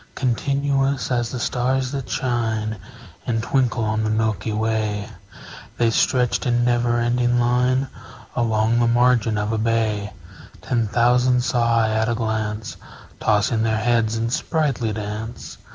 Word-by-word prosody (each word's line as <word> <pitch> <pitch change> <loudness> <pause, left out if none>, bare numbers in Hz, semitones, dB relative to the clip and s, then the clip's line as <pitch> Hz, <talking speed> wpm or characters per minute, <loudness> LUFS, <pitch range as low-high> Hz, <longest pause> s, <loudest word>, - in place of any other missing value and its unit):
Continuous 135 +2 0
as 120 -2 0
the 125 - -5
stars 130 +2 0
that 135 -3 -5
shine 110 -4 -1 0.5
And 115 -2 0
twinkle 125 -2 +1
on 110 0 0
the 110 - 0
milky 110 -1 -1
way, 110 -1 -1 0.7
The 115 -1 +2
stretched 125 +2 +1
in 120 0 +2
never 120 -1 +1
ending 120 +1 +1
line 125 +2 +2 0.5
Along 115 0 +1
the 120 - +3
margin 120 -2 +3
of 105 +1 -1
a 110 - -1
bay: 110 -2 0 0.5
Ten 115 -3 -1
thousand 125 +2 +3
saw 115 -2 +2
I 110 - +1
at 110 +1 +1
a 120 - 0
glance, 110 -1 -3 0.4
Tossing 110 +1 +1
their 110 -1 +1
heads 115 -1 +1
in 115 +1 -2
sprightly 135 -6 0
dance. 110 +2 -6
115 Hz, 140 wpm, -22 LUFS, 110-125 Hz, 0.7 s, the